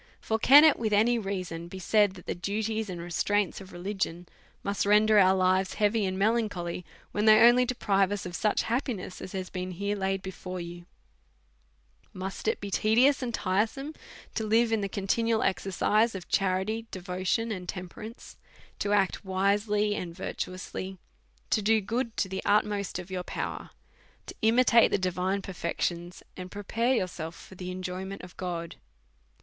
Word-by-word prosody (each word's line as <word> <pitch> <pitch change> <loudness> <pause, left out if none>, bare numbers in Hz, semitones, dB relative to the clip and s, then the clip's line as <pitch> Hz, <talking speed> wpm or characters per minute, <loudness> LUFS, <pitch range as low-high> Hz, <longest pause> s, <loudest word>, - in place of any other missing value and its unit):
For 220 0 -1
can 285 +6 +8
it 310 -2 +5
with 220 -2 0
any 230 +3 +4
reason 185 -5 -4
be 190 - -8
said, 205 +2 +3
that 180 - -12
the - - -2
duties 215 +4 -2
and 180 -2 -5
restraints 195 +4 0
of 190 - -12
religion 180 -1 -3 0.4
must 200 0 -1
render 210 +1 +5
our 190 -1 +5
lives 185 0 +2
heavy 210 -1 +2
and 185 0 -3
melancholy, 200 -5 0 0.3
when 210 +1 0
they 215 0 +8
only 240 +2 +7
de 255 0 -2
prive 195 -3 +2
us 205 -2 -3
of 180 -1 -6
such 210 +4 +1
happiness 230 -6 -3
as - - -8
has 185 -1 -4
been 185 -1 -4
here 200 +3 -2
laid 195 -1 -1
before 185 -1 -6
you"' 175 0 -8 1.3
Must 190 +1 -5
it - - +1
be 200 -1 -6
tedious 245 +9 +4
and 250 -2 -2
tiresome 225 +9 -1 0.4
to 220 - -2
live 225 +2 +3
in 225 -2 +1
the 200 - -2
conti 195 +3 0
nual 230 -1 +1
exercise 205 +4 +1
of 185 -2 -7
charity, 195 +4 0
devotion, 185 +5 -2
and 180 -4 -5
temperance, 210 +5 -8 0.4
to 205 - 0
act 195 -1 +1
wisely 205 +2 +1
and 175 -5 -5
virtuously, 185 +1 -5 0.5
to 215 - +3
do 220 +2 +3
good 230 +3 -3
to - - +1
the 190 0 -4
utmost 205 -2 +1
of 180 +1 -8
your 185 -1 -2
power, - - -5 0.6
to - - -8
imitate 230 +1 +5
the - - +2
divine 185 +1 -1
perfections, 175 -1 -3
and 185 0 -7
pre 205 +2 -7
pare 235 +6 +1
yourself 175 -5 -3
for - - -13
the 180 0 -7
enjoyment 185 +1 -5
of 180 0 -11
God? 170 -2 -5
195 Hz, 170 wpm, -28 LUFS, 185-220 Hz, 1.3 s, can